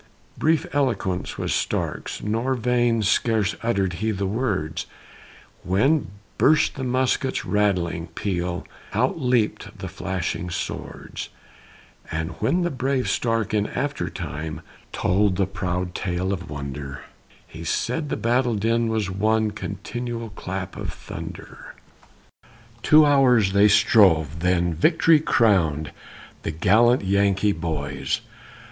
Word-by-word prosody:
Brief 160 0 +2
eloquence 115 -10 -1
was - - -1
Stark's - - -2
nor 115 +5 0
vain 120 -2 +1
Scarce 110 -1 +2
utter'd 100 -6 0
he 110 - +1
the 100 -2 -1
words, 90 -7 -2 0.7
When 135 - +2 0.3
burst 155 +1 +4
the 135 - -5
musket's 130 +1 0
rattling 90 -5 0
peal 90 0 -3 0.3
Out 130 +8 +1
leap'd 125 -4 0
the - - -6
flashing 90 -1 -3
swords; 85 - -5 0.8
And 80 +2 -3
when 180 +1 +2
brave 135 -5 -1
Stark 115 -3 0
in 105 -1 +1
after 145 +1 -2
time 75 +2 -5 0.3
Told 100 0 +2
the 95 - +2
proud 90 -2 -3
tale 95 +1 -2
of 90 -4 -6
wonder, 70 -1 -6 0.4
He 80 +1 -10
said 125 - -1
the - - -1
battle 120 0 +1
din 115 +3 +1
was 110 -4 -1
one 110 +2 +1
"Continual 115 +3 -5
clap 95 -2 -5
of - - -4
thunder." - - -9 1.1
Two 155 +4 +6
hours 125 -8 +4
they 100 +1 +6
strove 90 - +4
then 90 0 +1
victory 160 - +4
crown'd 85 - +2 0.5
The - - -3
gallant 110 +10 +3
Yankee 100 +1 +2
boys. 70 -6 -2
100 Hz, 120 wpm, -23 LUFS, 90-120 Hz, 1.1 s, Two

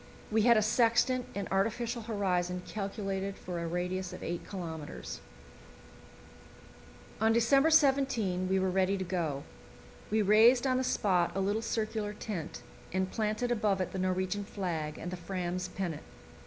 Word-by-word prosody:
We 220 +1 +3
had 235 +1 +6
a 215 - +3
sextant 240 +3 +2
and 200 -1 -3
artificial 230 +5 0
horizon 180 -5 -1
calculated 195 -1 -3
for 180 -1 -5
a 170 - -3
radius 180 +2 -2
of - - -8
8 175 0 -4
kilometres. 165 -5 -6 2.0
On 220 0 +4
December 275 +7 +4
17 265 - +3
we 190 - +3
were 190 0 +1
ready 190 +1 +2
to 190 - -2
go. 170 -6 -2 0.7
We 215 0 +2
raised 225 +5 +6
on 255 -1 +2
the 260 - +1
spot 185 -8 +2
a - - 0
little 205 +3 0
circular 215 -2 -2
tent, 175 -9 -5 0.3
and 185 0 -1
planted 220 +2 -1
above 210 -4 +1
it 185 - -2
the 190 - -4
Norwegian 185 +2 0
flag 170 -7 -3
and 175 - -5
the 185 - -4
Fram's 180 0 -3
pennant. 180 -4 -4
195 Hz, 155 wpm, -31 LUFS, 180-220 Hz, 2.0 s, had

